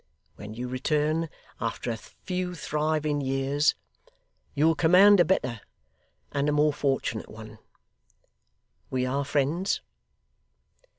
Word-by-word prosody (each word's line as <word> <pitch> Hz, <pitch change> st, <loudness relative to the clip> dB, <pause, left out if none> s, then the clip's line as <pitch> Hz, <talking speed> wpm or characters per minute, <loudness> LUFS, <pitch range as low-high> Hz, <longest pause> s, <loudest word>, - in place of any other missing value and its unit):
When 105 Hz, +1 st, -9 dB
you 125 Hz, +2 st, -4 dB
return, 150 Hz, +5 st, 0 dB, 0.3 s
after 115 Hz, +1 st, -3 dB
a -, -, -2 dB
few 180 Hz, -, -5 dB
thriving 150 Hz, -2 st, -1 dB
years, 135 Hz, +2 st, +1 dB, 0.8 s
you 145 Hz, -, +3 dB
will 165 Hz, -, +5 dB
command 185 Hz, +5 st, +6 dB
a 175 Hz, -, +6 dB
better, 125 Hz, -, 0 dB, 0.7 s
and 145 Hz, +1 st, 0 dB
a -, -, +2 dB
more 150 Hz, 0 st, +3 dB
fortunate 135 Hz, -6 st, -1 dB
one. 110 Hz, 0 st, -11 dB, 1.3 s
We 130 Hz, -1 st, 0 dB
are 135 Hz, +2 st, -1 dB
friends? 145 Hz, +7 st, 0 dB
145 Hz, 115 wpm, -27 LUFS, 130-160 Hz, 1.3 s, command